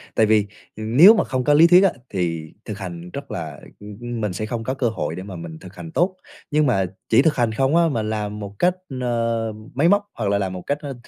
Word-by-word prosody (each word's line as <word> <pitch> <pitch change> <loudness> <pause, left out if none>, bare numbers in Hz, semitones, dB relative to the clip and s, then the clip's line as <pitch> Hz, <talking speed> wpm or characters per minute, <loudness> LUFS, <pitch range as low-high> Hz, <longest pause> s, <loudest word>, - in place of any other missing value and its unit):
Tại 110 - +4
vì, 105 -1 +3 0.3
ừ, 110 - -7
nếu 145 - +8
mà - - +2
không 130 -1 -2
có 145 - +3
lý 165 +3 +7
thuyết 180 +2 +7
á, 195 - +4 0.2
thì 85 -4 -3
thực 105 -2 -6
hành 90 -3 -7
rất 140 0 -7
là 75 -4 -6 0.2
ưm, 105 0 -10
ưm, 120 -1 -4
mình 105 -3 -1
sẽ 110 +4 -3
không 115 0 -4
có 130 - -2
cơ 125 -3 0
hội 110 - -3
để 95 - -6
mà 95 -2 -8
mình 85 -1 -8
thực 95 0 -13
hành 165 - -9
tốt. 180 +3 +1 0.4
Nhưng 150 0 +3
mà 95 -7 +2 0.2
chỉ 115 +3 +6
thực 155 +1 +2
hành 120 -3 +1
không 135 +6 +1
á, 170 -1 +4
mà 115 -5 -1
làm 105 -1 -3
một 100 -1 -7
cách, 180 0 +3 0.3
ờ, 115 -2 -1 0.2
máy 145 +6 +3
móc 205 +1 +3
hoặc 105 -4 -2
là 100 - +2
làm 95 -2 -2
một 90 - -6
cách, 145 - 0
ơ, 140 -2 -5
115 Hz, 265 wpm, -22 LUFS, 100-140 Hz, 0.4 s, nếu